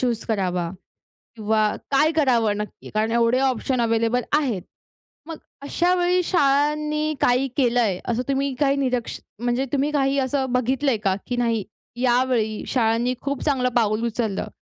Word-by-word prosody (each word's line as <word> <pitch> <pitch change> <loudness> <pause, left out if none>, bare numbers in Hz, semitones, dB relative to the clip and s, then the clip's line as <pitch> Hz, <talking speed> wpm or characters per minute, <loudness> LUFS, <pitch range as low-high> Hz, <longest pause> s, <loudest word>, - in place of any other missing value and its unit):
Choose 240 -3 -1
करावा 180 -5 -1 0.7
किंवा 215 -1 +1 0.2
काय 300 +4 +4
करावं 235 -9 +2
नक्की? 210 0 -7
कारण 215 +1 0
एवढे 235 +2 +2
ऑप्शन 260 -1 0
अवेलेबल 230 +1 +1 0.2
आहेत. 240 - -2 0.7
मग 325 -2 -6 0.2
अशा 345 +5 +1
वेळी 360 0 +2
शाळांनी 300 0 +1
काही 250 +2 +3
केलंय? 235 -8 +2
असं 240 0 -1
तुम्ही 275 0 0
काही 275 -1 +3
निरक्ष 250 -3 -2 0.2
म्हणजे 245 +2 0
तुम्ही 285 +2 +1
काही 275 -1 +1
असं 265 0 -1
बघितलंय 255 0 +1
का? 190 -1 +2
की 245 - -2
नाही 230 -3 0 0.4
यावेळी 245 -3 +1
शाळांनी 235 0 +1
खूप 280 -1 -3
चांगलं 260 -4 +1
पाऊल 220 0 +1
उचललं 225 -3 -2
250 Hz, 145 wpm, -23 LUFS, 225-275 Hz, 0.7 s, काय